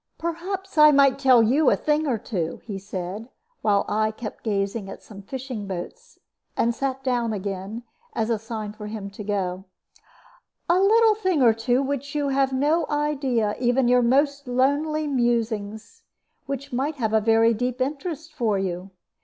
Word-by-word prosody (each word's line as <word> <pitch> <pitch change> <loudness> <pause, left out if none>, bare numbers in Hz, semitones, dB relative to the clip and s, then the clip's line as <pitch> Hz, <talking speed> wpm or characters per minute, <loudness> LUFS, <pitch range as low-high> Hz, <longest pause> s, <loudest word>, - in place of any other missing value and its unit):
"Perhaps 350 +2 -4
I 300 0 +9
might 275 -2 +4
tell 255 -4 +6
you 270 +6 +4
a - - +4
thing 305 +1 0
or 250 -5 +1
two," 185 -7 -4
he 200 -4 -5
said, 195 +3 -6 0.3
while 205 -2 +2
I 215 +1 +1
kept 215 0 -7
gazing 200 -1 -2
at - - -10
some 200 -2 -11
fishing 250 -1 -6
boats, 465 - -7 0.4
and 235 +1 +2
sat 270 +1 -3
down 240 -4 0
again, 200 +3 -5 0.3
as 225 +1 0
a 225 - 0
sign 220 -1 -6
for 210 -1 -8
him 210 -2 -6
to 205 +1 -8
go 190 -2 -2 1.0
"a 345 +2 +4
little 440 +3 +5
thing 375 -9 +1
or 230 -2 +6
two 245 +3 +1
of - - -2
which 280 +1 -4
you 290 -1 0
have 270 0 +2
no 295 +5 +1
idea, 275 -7 0
even 245 +1 +2
in - - +2
your 250 0 +5
most 280 +3 +2
lonely 285 +5 +1
musings, 235 - -1 0.5
which 275 -1 -5
might 280 +5 -1
have 220 -5 -2
a 220 - +4
very 225 +1 +4
deep 250 +3 -2
interest 305 +4 -3
for 230 -8 0
you. 185 0 -3
245 Hz, 175 wpm, -24 LUFS, 215-285 Hz, 1.0 s, I